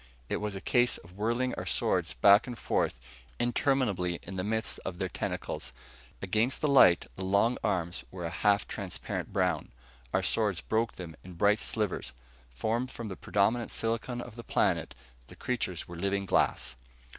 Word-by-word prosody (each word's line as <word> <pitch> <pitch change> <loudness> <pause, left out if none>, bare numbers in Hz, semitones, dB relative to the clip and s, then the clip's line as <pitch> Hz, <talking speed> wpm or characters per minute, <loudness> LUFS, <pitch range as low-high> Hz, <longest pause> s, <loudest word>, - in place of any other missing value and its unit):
It - - 0
was 105 -1 -3
a 95 - -5
case 120 +1 +3
of 85 - -15
whirling 120 +5 0
our - - -4
swords 65 - 0
back 100 - +6
and 120 -2 -5
forth - - 0 0.4
interminably 120 -8 +1
in 95 - -7
the 90 - -1
midst 110 +1 -1
of 90 -2 -4
their 95 - -1
tentacles. - - -4 0.5
Against 110 +7 +1
the 150 - +1
light, 130 -11 +6
the 95 - -4
long 100 +6 +3
arms 85 -1 -1
were 90 -2 -6
a 85 - -3
half 100 +4 +2
transparent 95 -3 -4
brown. - - 0 0.4
Our 95 - +1
swords 100 -2 +1
broke 110 +5 0
them 85 -3 -8
in 90 - -10
bright 100 +5 +3
shivers. 105 -4 -2 0.4
Formed 115 - -1
from 115 -4 -6
the 95 - -5
predominant 110 +6 +1
silicon 115 +2 -2
of 120 -2 -9
the 120 - -7
planet, - - +1 0.3
the - - -12
creatures 105 -9 -2
were 85 - -8
living 100 +3 -1
glass! 70 - +1
100 Hz, 170 wpm, -30 LUFS, 90-115 Hz, 0.5 s, back